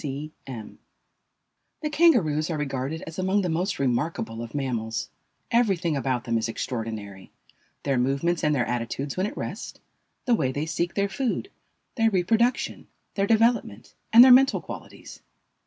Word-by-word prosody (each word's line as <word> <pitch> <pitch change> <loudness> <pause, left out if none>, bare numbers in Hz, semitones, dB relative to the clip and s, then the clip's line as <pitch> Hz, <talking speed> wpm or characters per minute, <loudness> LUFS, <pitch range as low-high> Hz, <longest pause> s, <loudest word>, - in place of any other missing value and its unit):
C. 145 +1 -5 0.2
C. - - -6
M. 110 -4 -9 1.0
The 300 -1 -2
Kangaroos 195 - +3
are 160 - -2
regarded 140 +3 -3
as 160 +2 -8
among 190 +2 +1
the 180 - -1
most 180 +4 -1
remarkable 120 -3 -1
of 115 +3 -8
mammals. 115 -5 -2 0.4
Everything 195 -9 +2
about 130 -3 -1
them 115 -2 0
is 110 - -2
extraordinary; 110 -6 -5 0.5
their 135 -3 +1
movements 140 +7 0
and 150 -1 +3
their 125 -3 +1
attitudes 120 +4 -3
when 185 +2 0
at - - -8
rest, - - -6 0.5
the 245 - +3
way 135 - +1
they 145 +3 -2
seek 170 +1 -2
their 200 0 +1
food, 255 - -2 0.5
their 225 -1 +4
reproduction, 225 +6 +1 0.3
their 195 0 0
development, 225 - +1 0.2
and 235 +2 +10
their 260 - +8
mental 270 +2 +6
qualities. - - -10
155 Hz, 155 wpm, -25 LUFS, 125-200 Hz, 1.0 s, and